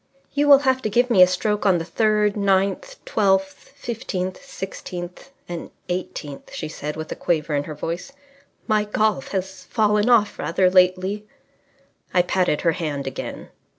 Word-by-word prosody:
"You 290 +1 +2
will 285 -1 +10
have 260 0 +3
to 215 - -1
give 245 +4 +2
me 195 -5 +6
a 180 - +9
stroke 210 +3 -1
on 190 -3 +4
the 165 - -4
third, 210 +2 +2
ninth, 200 - +1
twelfth, 190 -1 0
fifteenth, 215 -5 -4
sixteenth 185 -6 -7 0.2
and 175 -1 -6 0.2
eighteenth," 170 -5 -5
she 155 - -4
said, 150 -1 -5
with 155 0 -6
a - - -2
quaver 155 -2 -1
in 145 0 0
her 155 - -7
voice. 170 - -5 0.5
"My 215 -2 +2
golf 210 -7 0
has 190 -1 -4
fallen 210 0 +2
off 220 -4 +3
rather 185 +2 +2
lately." 185 +3 +2 0.9
I 180 - +5
patted 180 -4 +1
her 165 - +3
hand 150 -4 -3
again. 135 - -6
190 Hz, 160 wpm, -22 LUFS, 175-215 Hz, 0.9 s, will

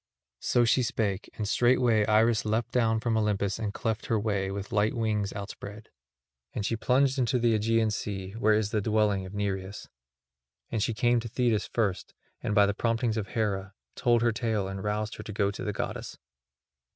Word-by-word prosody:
So 120 -1 +2
she 120 +3 +3
spake, 105 -4 -1
and 105 - -2
straightway 120 -2 +3
Iris 110 0 +3
leapt 110 +2 -1
down 115 -2 +2
from 115 0 0
Olympus 105 -2 0
and 105 -2 -2
cleft 110 +1 -3
her 110 - +1
way, 100 -3 -1
with 100 +2 -5
light 110 -1 +1
wings 105 -3 0
outspread. 105 +1 -8 0.7
And 105 - -2
she 115 - 0
plunged 130 +4 +2
into 125 +1 +2
the 120 -1 +2
Aegean 110 +1 +2
Sea, 95 -2 -4
where 110 0 +2
is 105 -1 0
the 110 - +1
dwelling 105 -3 +1
of 95 - -10
Nereus. 100 -1 -3 0.8
And 115 - -1
she 115 +1 0
came 120 +2 +3
to 115 - -5
Thetis 115 -2 0
first 100 -5 -2 0.3
and, 105 - -1
by 105 -1 +6
the 100 - 0
promptings 115 +1 0
of 105 -2 -2
Hera, 100 -3 -2 0.2
told 120 -1 +2
her 120 - +3
tale 110 -3 -1
and 95 0 -5
roused 105 +1 -2
her - - -7
to - - -7
go 100 -1 +1
to 100 - -7
the 105 - -1
goddess. 100 - -5
110 Hz, 190 wpm, -28 LUFS, 100-115 Hz, 0.8 s, by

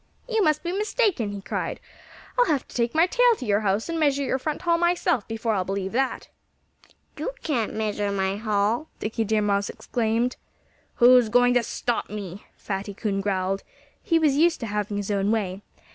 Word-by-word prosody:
"You 450 -3 +1
must 305 -2 +2
be 345 - -2
mistaken!" 405 - 0
he 200 -1 -6
cried. - - -3 0.6
"I'll - - +4
have 290 -5 0
to - - -15
take 235 +3 0
my 325 +2 +6
tail 485 +5 +4
to 255 - -6
your 205 -2 +2
house 205 0 0
and 335 -1 -2
measure 285 -2 +2
your 265 0 0
front 305 +3 -3
hall 335 -1 +2
myself 345 - +1
before 225 0 -1
I'll 190 -3 0
believe 195 0 -3
that." 265 +3 -1 0.9
"You - - -3
can't 245 -9 -1
measure 210 -2 -1
my 195 0 -1
hall!" 215 +6 0
Dickie 225 +1 -2
Deer 215 0 +1
Mouse 200 -1 +1
exclaimed. 235 +1 -1 0.6
"Who's 245 -2 +6
going 245 +2 +4
to 245 - +4
stop 235 +1 -2
me?" 205 -2 -7
Fatty 200 0 -5
Coon 200 -1 -1
growled. 195 -1 -1 0.4
He 330 - +2
was 305 -4 +3
used 335 +2 +3
to - - -2
having 210 -1 -2
his 205 0 -3
own 200 0 +1
way. 200 -3 -1
225 Hz, 190 wpm, -25 LUFS, 205-305 Hz, 0.9 s, my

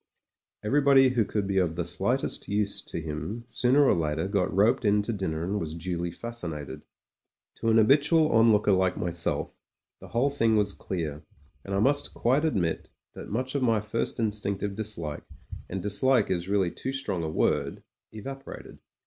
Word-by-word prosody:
Everybody 135 +2 +5
who 125 -3 +2
could 105 -1 -2
be 95 -1 +1
of 85 -3 0
the 85 0 -2
slightest 100 +10 -1
use 100 0 -1
to - - -6
him 80 +9 -5
sooner 125 +4 +3
or - - +5
later 80 +1 -1
got 100 -2 0
roped 110 +9 +3
in 105 -1 +3
to 115 - -3
dinner 80 -6 -3
and 100 +4 -1
was 80 -2 -4
duly 85 0 -3
fascinated. 85 - -6 0.8
To 115 - -1
an 110 - +4
habitual 145 +7 +4
onlooker 110 -2 +4
like 95 -1 +2
myself, 85 -1 -2 0.4
the - - -12
whole 125 +5 +1
thing 115 -5 +2
was 105 -2 +2
clear, 80 -5 -4 0.4
and 100 - -4
I - - +1
must 145 +4 +1
quite 135 +6 +2
admit 90 - -1 0.2
that - - -9
much 130 +4 -2
of 140 - -1
my 115 -4 +3
first 105 +3 -2
instinctive 105 -2 -1
dislike 95 -8 -4 0.3
— - - -12
^and 95 +1 -3
dislike 105 +3 +2
is 90 0 -2
really 100 -4 +1
too 130 - -5
strong 135 -9 -2
82 80 - -2
MEN, 80 - -7
WOMEN - - +3
AND - - -1
GUNS - - -5
a - - -7
word— - - -21 0.3
evaporated. 135 +5 -9
105 Hz, 190 wpm, -27 LUFS, 90-120 Hz, 0.8 s, Everybody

